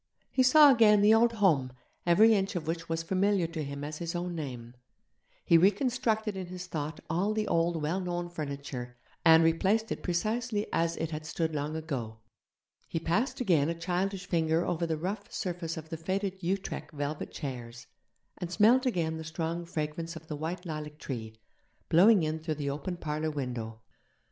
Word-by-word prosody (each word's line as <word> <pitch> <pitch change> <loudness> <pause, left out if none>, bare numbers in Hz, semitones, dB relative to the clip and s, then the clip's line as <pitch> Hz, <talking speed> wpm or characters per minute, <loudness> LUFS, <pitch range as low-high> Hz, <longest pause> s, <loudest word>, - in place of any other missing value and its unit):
He 260 - +2
saw 285 +3 +8
again 215 -4 +6
the 210 +1 +7
old 230 +1 +4
home, 155 - +2 0.3
every 215 +6 +6
inch 195 -2 0
of 170 -3 -3
which 165 +1 -3
was 165 0 -1
familiar 190 +1 +2
to 165 -1 -4
him 140 0 -6
as 150 +1 -5
his 170 0 -4
own 175 0 -2
name; 125 -7 -6 0.7
he 170 - +6
reconstructed 220 +2 +1
in 185 -2 -5
his 180 0 -7
thought 155 -3 -4
all 190 +7 0
the 215 -1 -1
old 170 0 +1
well 165 +6 0
known 175 -1 -3
furniture, 140 -6 -6 0.3
and 165 -1 +7
replaced 195 +7 +2
it - - -3
precisely 215 +4 -1
as 165 0 +1
it 165 0 -3
had 155 0 -4
stood 160 0 -2
long 150 +1 -2
ago. 135 -9 -4 0.7
He 165 - -2
passed 215 - 0
again 165 - +3
a 170 - -1
childish 180 +3 -2
finger 165 -1 +1
over 170 0 -1
the 160 -1 -1
rough 195 +5 -4
surface 170 -3 -3
of 160 0 -8
the 165 - -4
faded 190 +3 -3
Utrecht 190 +1 -3
velvet 145 +1 -4
chairs, 120 -4 -7 0.5
and 175 -1 -5
smelled 235 +7 +4
again 165 -8 0
the 160 - -6
strong 165 +2 -3
fragrance 165 +1 -4
of 160 - -9
the 155 - -5
white 170 +5 -4
lilac 150 -2 -6
tree, 110 -7 -6 0.5
blowing 190 +2 +6
in 155 +1 -1
through 155 -1 -3
the 140 -1 -2
open 155 +6 -4
parlour 155 -1 -2
window. 120 -6 -5
165 Hz, 180 wpm, -30 LUFS, 155-190 Hz, 0.7 s, saw